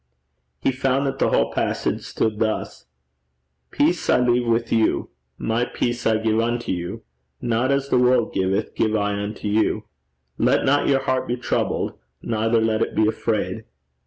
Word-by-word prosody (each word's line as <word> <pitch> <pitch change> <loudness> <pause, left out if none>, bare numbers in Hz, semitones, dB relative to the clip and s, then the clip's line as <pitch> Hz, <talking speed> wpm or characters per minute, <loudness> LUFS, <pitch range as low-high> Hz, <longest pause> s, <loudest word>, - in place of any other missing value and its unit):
He - - +1
found 135 +1 0
that 135 0 -2
the - - +3
whole 60 - +1
passage - - -1
stood 110 -1 -2
thus: 110 - -2 0.8
'Peace 165 +4 +1
I - - +5
leave 125 -1 +2
with 115 0 +1
you, 110 -1 +1 0.3
my 115 +2 0
peace 120 -1 -2
I 110 -1 +3
give 110 0 +1
unto 120 +1 -1
you: 90 -1 -4 0.4
not 120 +2 0
as 140 0 0
the 125 - +3
world 125 -2 +3
giveth 95 0 0
give 110 -1 +1
I 105 -1 0
unto 105 +1 -5
you. 105 +1 +1 0.6
Let - - +3
not 145 +2 +3
your 135 -1 +2
heart 130 0 0
be 120 - -1
troubled, 120 - -2 0.2
neither 115 0 +1
let 110 0 +1
it - - -1
be 110 - +3
afraid.' 110 -1 -2
115 Hz, 165 wpm, -22 LUFS, 110-125 Hz, 0.8 s, I